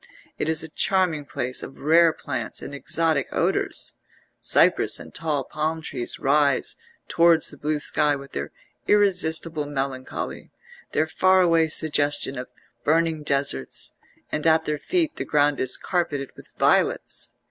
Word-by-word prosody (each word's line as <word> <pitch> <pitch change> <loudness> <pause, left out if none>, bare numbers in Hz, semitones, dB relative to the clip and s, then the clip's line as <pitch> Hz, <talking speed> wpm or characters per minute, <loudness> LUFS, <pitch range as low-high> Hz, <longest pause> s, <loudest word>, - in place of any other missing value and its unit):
It 155 - -1
is 160 0 +2
a - - -5
charming 170 -3 +1
place 125 -3 -3
of - - -9
rare 165 +3 +4
plants 145 -3 -5
and - - -8
exotic 155 0 0
odours; - - +1 0.5
cypress - - +3
and - - -12
tall 155 -4 -1
palm 155 +3 -3
trees 125 -6 -4
rise 140 -1 +2 0.3
towards 170 -1 +3
the 145 - -13
blue 150 0 -1
sky 145 0 +1
with 140 0 -10
their 70 +1 -5 0.4
irresistible 165 -6 +2
melancholy, 135 -2 -5 0.4
their 155 - +2
far 185 +3 +3
away 165 -2 +3
suggestion 145 -3 +1
of 125 - -6 0.4
burning 160 0 +1
deserts; 140 - -1 0.4
and 150 +2 -1
at 160 0 +4
their 150 -1 -2
feet 335 - -1
the - - -2
ground 145 -1 +1
is 130 - +1
carpeted 145 -7 -2
with - - -14
violets. - - +1
150 Hz, 145 wpm, -24 LUFS, 140-165 Hz, 0.5 s, rare